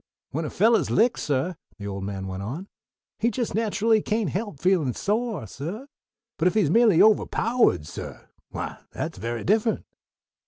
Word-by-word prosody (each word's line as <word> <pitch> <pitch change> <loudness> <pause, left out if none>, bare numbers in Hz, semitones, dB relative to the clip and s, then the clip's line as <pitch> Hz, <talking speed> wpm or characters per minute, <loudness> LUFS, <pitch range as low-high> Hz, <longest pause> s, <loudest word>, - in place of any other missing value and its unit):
"When 160 +3 -2
a - - -3
fellah's 225 +4 +3
licked, 230 +3 +3
suh," 145 +5 0 0.2
the 100 - -8
old 100 -1 -4
man 100 -1 -4
went 95 0 -5
on, 140 - -5 0.5
"he 230 +2 +2
just 240 -1 -2
natcherly 220 0 +2
kain't 210 -7 0
help 205 -7 -4
feelin' 165 -8 +2
sore, 215 - -1
suh; 175 - -6 0.5
but 165 - +3
if 180 - +1
he's 190 -9 +3
merely 225 -4 +5
ovahpowahed, 220 - +3
suh - - -7 0.3
why - - -5
that's - - -5
very 115 +2 -3
different." 220 +3 +1
190 Hz, 160 wpm, -25 LUFS, -, 0.5 s, merely